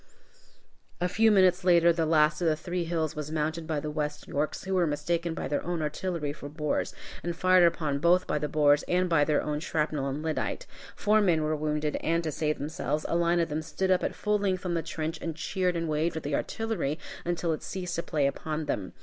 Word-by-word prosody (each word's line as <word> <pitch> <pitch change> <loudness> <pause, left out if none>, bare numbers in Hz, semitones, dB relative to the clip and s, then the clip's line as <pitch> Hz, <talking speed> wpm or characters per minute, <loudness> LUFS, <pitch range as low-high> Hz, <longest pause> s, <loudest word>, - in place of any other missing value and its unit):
A 180 - +1
few 220 +5 +3
minutes 185 -3 +4
later 170 -1 +5
the 165 -1 0
last 155 +1 +3
of 170 - +2
the 155 - +3
three 175 +3 -3
hills 160 -2 -1
was 150 0 -5
mounted 160 +1 -2
by 155 -2 -1
the 150 +1 -4
West 150 -1 -3
Yorks, 150 +2 -2
who 190 - -3
were 180 -3 +3
mistaken 165 +3 -1
by - - -3
their 145 - -1
own 170 -2 -2
artillery 150 -1 -2
for 145 -1 -8
Boers, 150 0 -2 0.3
and 170 0 -3
fired 185 0 +5
upon 150 -4 -1
both 175 +4 +4
by 150 - -1
the 150 - -1
Boers 145 -1 +4
and 180 +1 +2
by 165 -4 +4
their 150 0 +1
own 150 -1 -2
shrapnel 150 -3 -1
and 140 +3 -3
lyddite. 160 -1 -2 0.3
Four 215 +1 +3
men 170 -6 +3
were 155 0 0
wounded, 150 0 -1
and, 165 +1 0
to 155 - -2
save 150 +1 -1
themselves, 150 0 -3
a - - -1
line 170 0 +2
of 165 - +1
them 155 +1 -2
stood 190 +4 -1
up 185 - +3
at - - -2
full 210 0 0
length 190 -2 -1
on 175 - -1
the 165 - 0
trench 160 0 -4
and 165 -2 -3
cheered 180 +2 -1
and 165 0 -1
waved 155 +2 0
at 160 - -5
the 145 - -3
artillery 180 -5 -1 0.3
until 170 -1 -1
it 155 - 0
had - - -19
ceased 180 -2 -4
to - - 0
play 150 -4 0
upon 155 +2 -2
them. 95 -9 -3
160 Hz, 235 wpm, -28 LUFS, 150-175 Hz, 0.3 s, later